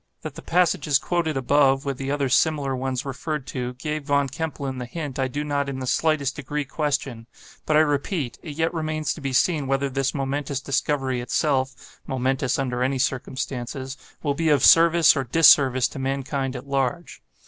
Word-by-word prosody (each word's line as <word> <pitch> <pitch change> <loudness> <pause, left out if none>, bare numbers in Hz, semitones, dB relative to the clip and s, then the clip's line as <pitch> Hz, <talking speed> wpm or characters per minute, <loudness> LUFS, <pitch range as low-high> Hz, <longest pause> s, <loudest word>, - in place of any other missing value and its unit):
That - - -6
the - - -10
passages 160 -5 +2
quoted 160 0 -1
above, 135 +1 +3
with 140 -2 -3
the 135 0 -4
other 140 -1 0
similar 140 0 +1
ones 130 0 -3
referred 140 +1 -4
to, 125 -1 -4
gave 150 +3 -4
Von 140 -1 +1
Kempelen 140 -3 -4
the 125 - -5
hint, 145 -1 -6
I 130 - +1
do 145 +3 -4
not 140 -1 -1
in 135 - -4
the 130 - -4
slightest 145 0 +1
degree 145 0 -4
question; 135 -5 -3 0.4
but 155 - +3
I - - +7
repeat, 145 -2 -1
it 150 -4 -8
yet 160 +2 0
remains 155 -2 -2
to 155 - -11
be 135 -1 -3
seen 150 +1 +1
whether 135 +1 0
this 135 +2 -1
momentous 140 0 -2
discovery 135 -2 -1
itself 130 +1 -2
(momentous 130 0 0
under 125 -3 -2
any 130 +1 +1
circumstances) 130 0 -3 0.3
will 145 -2 +1
be 160 +2 0
of 145 -3 +4
service 165 0 +6
or 135 - 0
disservice 130 -2 +5
to - - -8
mankind 135 0 -2
at 125 - -7
large. 140 - -2
140 Hz, 180 wpm, -24 LUFS, 130-150 Hz, 0.4 s, I